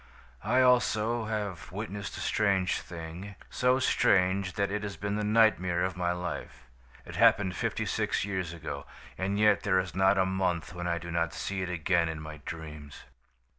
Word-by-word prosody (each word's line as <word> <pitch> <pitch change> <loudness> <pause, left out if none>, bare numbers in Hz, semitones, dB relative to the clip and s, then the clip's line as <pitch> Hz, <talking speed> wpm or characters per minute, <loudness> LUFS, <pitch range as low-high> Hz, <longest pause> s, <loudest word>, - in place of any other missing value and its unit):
"I, 125 +5 +3
also, 120 -2 +3
have 100 -6 -4
witnessed 100 0 -5
a - - -5
strange 100 -3 +1
thing 85 +4 -8 0.2
so 125 0 +3
strange 95 -6 +2
that 100 -2 0
it 105 +1 -1
has 100 -4 -5
been 100 +3 -2
the 105 - -1
nightmare 105 -5 +3
of 95 0 -1
my 90 -1 0
life. 90 -6 -5 0.4
It - - -8
happened 95 -2 +4
fifty - - -1
six - - 0
years 95 -4 -2
ago, 85 -2 -6 0.3
and 95 +2 -1
yet 105 -1 +4
there 95 -2 +2
is 90 -3 -1
not 95 +2 +4
a 95 - +4
month 95 -2 -1
when 90 0 -4
I 85 0 0
do 85 0 -7
not 85 0 -1
see 100 -1 -3
it 90 - -3
again 85 -1 +1
in 80 -1 -4
my 75 0 -8
dreams. 75 -3 -8
95 Hz, 180 wpm, -29 LUFS, 85-105 Hz, 0.4 s, happened